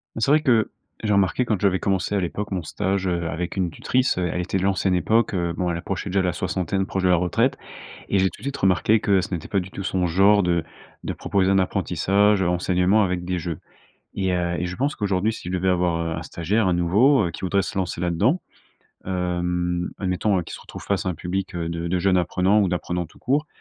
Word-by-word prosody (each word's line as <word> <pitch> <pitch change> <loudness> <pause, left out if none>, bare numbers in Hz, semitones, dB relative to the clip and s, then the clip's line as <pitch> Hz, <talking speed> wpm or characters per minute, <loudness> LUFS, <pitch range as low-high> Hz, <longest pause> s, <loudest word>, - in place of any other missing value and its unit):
Bah, 115 - -4
c'est 125 - +2
vrai 150 +1 +5
que, 120 -7 +3 0.3
j'ai 105 -2 +1
remarqué 100 +4 +2
quand 110 -5 -1
j'avais 95 -2 +2
commencé 95 0 0
à 100 - +2
l'époque 100 +4 -4
mon 90 -3 -1
stage, 95 +3 -1
heu, 85 -1 -1
avec 85 +3 -4
une 90 -3 0
tutrice, 130 +8 0
elle 90 -1 -1
était 95 +2 -1
de - - -3
l'ancienne 95 -1 +1
époque. 110 +5 +2
Heu, 85 -2 0
bon 90 +1 -2
elle 85 - -1
approchait 95 +3 -4
déjà 95 +1 +1
la 90 -1 0
soixantaine, 95 +3 -2
proche 95 - -2
de 95 - +3
la 90 - +5
retraite. 90 0 +1 0.5
Et 100 - +2
j'ai 95 0 +3
tout - - -15
de - - -14
suite 140 0 -3
remarqué 95 +3 +3
que 100 -3 +2
ce - - -6
n'était 80 - -4
pas 100 - +1
du 90 - -6
tout 100 0 -7
son 90 -1 0
genre 100 +4 +4
de 85 -2 +1 0.4
de - - -3
proposer 95 -1 0
un 95 - +4
apprentissage, 95 +2 +2
enseignement 90 +3 +2
avec 90 -2 -1
des 90 0 -2
jeux. 85 -2 -4 0.5
Et 95 -1 -1
heu, 85 -1 0
et 90 - -1
je 90 - -5
pense 140 +6 -1
qu'aujourd'hui, 100 +1 0
si 90 - -7
je - - -4
devais 95 +1 +1
avoir, 90 -2 +1
heu, 80 - -2
un - - -5
stagiaire, 95 +5 -1
un 90 - +2
nouveau, 100 +6 +3
qui - - -8
voudrait 95 +1 +1
se - - -6
lancer 90 -3 -2
là-dedans. 95 - +1 0.7
Hem, 90 -1 -1
admettons, 95 +1 0
hein, 90 - -1
qu'il - - -9
se - - -8
retrouve - - -10
face 95 -1 -1
à - - +2
un 90 - -3
public 90 +3 -4
de 85 0 -3
de 90 +1 0
jeunes 95 0 +3
apprenants 90 +4 +2
ou 100 - +2
d'apprenants 90 -1 -2
tout - - -21
court. 145 +4 0
95 Hz, 240 wpm, -23 LUFS, 90-100 Hz, 0.7 s, vrai